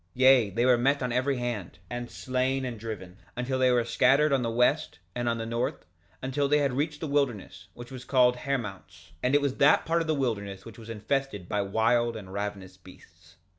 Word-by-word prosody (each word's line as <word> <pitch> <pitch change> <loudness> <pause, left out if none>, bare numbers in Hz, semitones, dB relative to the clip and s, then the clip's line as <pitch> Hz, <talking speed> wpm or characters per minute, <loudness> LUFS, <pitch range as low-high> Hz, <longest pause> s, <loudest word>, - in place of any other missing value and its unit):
2:37 85 - -40
Yea, 130 -4 +5
they 115 +6 0
were 125 -2 +5
met 135 +2 +2
on 125 - -1
every 130 +2 0
hand, 120 -7 -4
and 120 +2 -5
slain 130 +1 -1
and 120 -3 -5
driven, 105 -4 -7 0.2
until 130 +2 -2
they 130 0 +4
were 120 -1 +3
scattered 135 +5 +3
on 135 - +2
the 115 - -1
west, 120 +2 +1 0.2
and 120 -1 -1
on 115 - 0
the 115 - -4
north, 115 +1 -3 0.4
until 135 +2 0
they 150 +1 +3
had 140 -3 +1
reached 150 +3 -2
the 160 - -3
wilderness, 120 - -2
which 120 +2 -10
was 130 -1 -8
called 125 -2 +3
Hermounts; 115 -11 -5
and 130 +3 +2
it 145 - +4
was 140 -2 -1
that 145 +2 +5
part 165 +1 +1
of 165 - -3
the 155 - +1
wilderness 100 -8 -3
which 115 0 -11
was 115 0 -11
infested 115 -3 -2
by 105 - 0
wild 115 +4 +1
and 95 -3 -10
ravenous 100 -2 -5
beasts. 90 -2 -18
120 Hz, 215 wpm, -28 LUFS, 105-135 Hz, 0.4 s, Yea